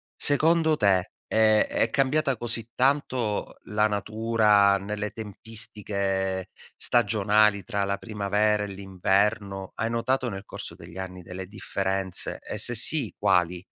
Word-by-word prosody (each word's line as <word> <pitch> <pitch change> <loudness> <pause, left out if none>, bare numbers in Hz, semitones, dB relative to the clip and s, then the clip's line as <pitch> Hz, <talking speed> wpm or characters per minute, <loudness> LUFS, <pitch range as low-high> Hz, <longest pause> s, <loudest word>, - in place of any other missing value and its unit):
Secondo 160 +2 +3
te, 95 -5 +2 0.2
ehm, 110 -1 +4
è 115 - 0
cambiata 135 0 +1
così 115 -1 -3
tanto 130 -5 0
la 105 +1 +1
natura 105 -1 +2
nelle 105 +1 -4
tempistiche 100 -3 -4 0.3
stagionali 105 -2 +2
tra 100 -4 -2
la 100 0 -1
primavera 105 0 0
e - - -4
l'inverno? 100 +1 -1
Hai 115 - -2
notato 125 +2 0
nel 95 -2 -7
corso - - -7
degli 85 +1 -12
anni 90 -1 -7
delle 90 +1 -8
differenze 95 -2 -2
e, - - -6
se - - +4
sì, - - +3
quali? 90 0 +1
105 Hz, 125 wpm, -26 LUFS, 95-115 Hz, 0.3 s, ehm